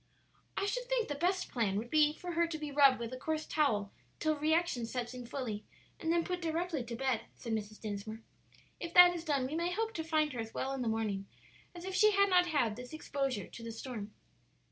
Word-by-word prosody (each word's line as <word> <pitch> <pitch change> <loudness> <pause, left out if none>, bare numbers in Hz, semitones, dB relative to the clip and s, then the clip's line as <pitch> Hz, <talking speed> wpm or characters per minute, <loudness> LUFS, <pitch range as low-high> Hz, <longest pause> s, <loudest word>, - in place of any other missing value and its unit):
"I 395 - +1
should - - -1
think - - 0
the - - 0
best 360 +6 0
plan 220 -6 +1
would 235 +3 -4
be 305 -1 +5
for 355 +3 -6
her 340 0 +2
to 330 -1 -4
be 300 -1 -5
rubbed 275 -2 +6
with 235 0 -5
a - - -4
coarse 315 +4 -2
towel 215 -10 +1 0.3
till 310 0 +2
reaction 310 -5 +1
sets 240 0 -3
in 250 -1 -7
fully 230 -6 -4 0.4
and 325 - 0
then 340 0 +3
put 360 0 -3
directly 330 -3 -1
to 235 0 -5
bed," 260 -2 0
said 230 - -5
Mrs. 215 -1 -4
Dinsmore. 215 +1 -5 0.6
"If 340 0 -6
that 355 0 +10
is 335 - -5
done 285 -5 +1
we 265 - -4
may 340 +2 0
hope 450 +4 -1
to 325 - -3
find 310 -2 +1
her 245 - -5
as 225 0 -5
well 265 - -1
in 270 - -3
the 240 - -1
morning 215 -3 -1 0.5
as 350 +1 -8
if 380 - -4
she 425 +2 +5
had 400 0 +4
not 360 -1 +5
had 245 -10 +1
this 250 +3 -9
exposure 275 - -2
to - - -10
the 230 0 -5
storm." 225 -3 -6
285 Hz, 230 wpm, -33 LUFS, 230-340 Hz, 0.6 s, that